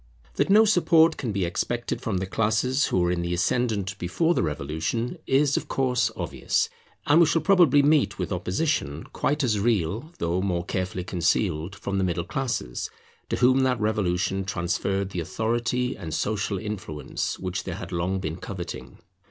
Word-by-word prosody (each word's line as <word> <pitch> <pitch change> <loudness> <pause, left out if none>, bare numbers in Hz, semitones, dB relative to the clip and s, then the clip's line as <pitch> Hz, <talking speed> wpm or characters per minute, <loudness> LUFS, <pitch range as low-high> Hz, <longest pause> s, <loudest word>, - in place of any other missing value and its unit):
That - - +2
no 215 +3 +7
support 170 -5 +4
can 120 -6 -3
be 100 -3 0
expected 120 +7 -2
from 105 -5 -1
the 95 - -1
classes 110 +7 +1
who 90 - +1
were 90 0 +2
in 90 -1 -1
the 85 0 -1
ascendant 100 0 0
before 160 - +1
the - - +1
Revolution, 80 - -2
is 140 +1 +3
of - - -3
course 125 -3 +1
obvious; - - -1 0.4
and 150 +3 +5
we 170 - +6
shall 165 0 +1
probably 170 -8 +5
meet 140 -9 +3
with - - -3
opposition, 90 - -1
quite 145 +1 0
as 110 -5 +1
real 110 - 0
though 85 +2 0
more 90 -3 -1
carefully 90 0 -2
concealed, 90 0 0
from 100 0 -3
the - - +1
middle 85 -2 -1
classes, 110 - -3 0.4
to - - 0
whom 130 +2 +4
that 130 -2 +2
revolution 95 -3 0
transferred 95 +1 -1
the 90 - -3
authority 120 +7 -1
and 80 -2 -5
social 100 -1 -1
influence 100 -7 -4
which 95 0 -3
they 95 - -3
had 90 +1 -7
long 90 +2 -1
been 80 -2 -4
coveting. 90 -2 -7
100 Hz, 170 wpm, -25 LUFS, 90-125 Hz, 0.4 s, no